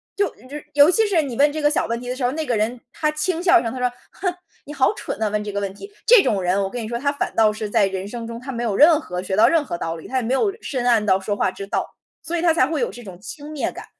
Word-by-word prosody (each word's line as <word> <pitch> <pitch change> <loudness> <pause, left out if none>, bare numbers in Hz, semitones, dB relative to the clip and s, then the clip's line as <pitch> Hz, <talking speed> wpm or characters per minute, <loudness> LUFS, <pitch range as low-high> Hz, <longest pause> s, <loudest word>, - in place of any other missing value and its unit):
就 405 -1 0
于 285 +4 -10
尤 285 +2 +7
其 440 +5 +3
是 380 -6 +2
你 270 -5 -5
问 290 +4 +4
这 310 +1 -4
个 295 - +4
小 305 - 0
问 230 +1 -2
题 245 - -9
的 250 - -2
时 255 - -5
候 245 - +3
儿， - - -6
那 315 +1 -3
个 245 - 0
人， 220 +3 -1
他 305 -1 0
轻 325 +3 -2
笑 360 -1 +6
一 - - -4
声， 230 - -3
他 260 - -5
说： 250 0 +1 0.2
“哼， 365 -2 -2 0.3
你 290 - -9
好 270 -3 +2
蠢 - - -6
呐， 220 - +1
问 210 0 -1
这 210 - -5
个 200 - -2
问 200 -1 -3
题。” 400 - -11 0.2
这 470 -4 +8
种 200 -3 +1
人 185 +2 +1
我 190 - -2
跟 245 +4 -5
你 220 - -5
说， 235 +1 -3
他 280 +3 0
反 285 - -3
倒 220 -1 +4
是 215 0 -5
在 205 - +3
人 190 0 -4
生 235 +2 -6
中 230 0 -7
他 255 +3 -11
没 240 0 -3
有 225 -4 0
任 315 +1 +6
何 180 -9 -5
学 190 +1 -3
到 215 - +6
任 325 -3 +2
何 175 - -4
道 165 0 -4
理， 160 - -10
他 265 - -6
也 260 - +2
没 240 +2 -1
有 395 +9 +1
深 255 -4 -3
谙 230 -3 +3
到 190 -2 +3
说 205 +2 -2
话 190 - +1
之 195 +1 -8
道， - - -3 0.3
所 345 - -2
以 - - -1
他 335 -1 +4
才 320 - +4
会 310 +2 -2
有 - - 0
这 240 - -10
种 185 -4 -10
轻 290 +8 -9
蔑 300 -3 -2
感。 - - -9
245 Hz, 360 characters per minute, -22 LUFS, 210-305 Hz, 0.3 s, 这